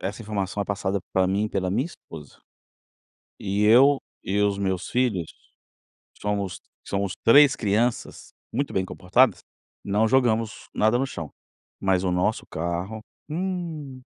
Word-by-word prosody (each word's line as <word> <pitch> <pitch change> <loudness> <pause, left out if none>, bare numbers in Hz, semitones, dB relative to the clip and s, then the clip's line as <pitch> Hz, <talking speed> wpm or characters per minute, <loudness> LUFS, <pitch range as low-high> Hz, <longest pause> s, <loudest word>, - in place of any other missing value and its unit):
Essa 100 +4 -4
informação 105 -2 -3
é - - 0
passada 100 -1 -2
pra 95 -1 +3
mim 100 +3 0
pela 95 -3 -1
minha 120 +9 0
esposa. 75 - -12 1.0
E 100 +1 -1
eu 130 +6 +6 0.3
e 100 +2 -1
os 100 -1 +2
meus 95 -1 -2
filhos, 110 -10 0 0.9
somos 100 -3 -2 0.3
somos 100 -1 -2
3 140 +3 +7
crianças, 110 +3 -1 0.2
muito 140 +4 -2
bem 95 -1 0
comportadas, 100 +9 +2 0.4
não 105 +3 +2
jogamos 115 -3 +1
nada 110 +3 +3
no 135 - 0
chão. 85 - -6 0.5
Mas 95 -1 +1
o 90 - +1
nosso 90 +5 0
carro, 85 +6 -4 0.3
hum. 165 -5 -4
105 Hz, 135 wpm, -25 LUFS, 95-120 Hz, 1.0 s, 3